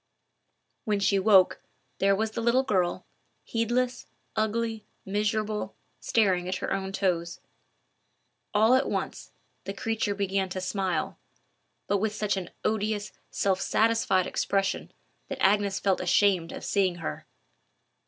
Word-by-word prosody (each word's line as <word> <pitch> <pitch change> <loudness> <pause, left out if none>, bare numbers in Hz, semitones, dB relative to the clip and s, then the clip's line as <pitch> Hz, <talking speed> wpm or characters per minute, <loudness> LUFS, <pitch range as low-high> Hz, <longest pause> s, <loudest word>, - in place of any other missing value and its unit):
When 210 -4 0
she 200 0 +3
woke, 190 -2 +5 0.4
there 195 0 +4
was 220 +2 -1
the 225 - -3
little 240 +3 +3
girl, 185 -7 0 0.4
heedless, 245 +2 -1 0.3
ugly, 220 0 -1 0.2
miserable, 210 +1 -1 0.2
staring 185 -5 +2
at 185 - -1
her - - -2
own 195 0 -2
toes. 175 -3 -1 1.1
All 220 +3 +4
at 260 +2 +3
once, - - -4 0.3
the 195 - -5
creature 220 -1 -1
began 195 -1 0
to 185 - -4
smile, 185 0 -2 0.7
but 200 - +1
with 215 +1 -1
such 210 -1 0
an 190 -2 -4 0.2
odious, 215 -1 -1 0.2
self 190 -1 0
satisfied 220 -5 +2
expression, 195 -1 -1 0.4
that - - -5
Agnes 200 0 +2
felt 195 -2 +1
ashamed 180 -1 +3
of - - -7
seeing 190 -3 +1
her. 75 - -6
200 Hz, 130 wpm, -27 LUFS, 190-220 Hz, 1.1 s, woke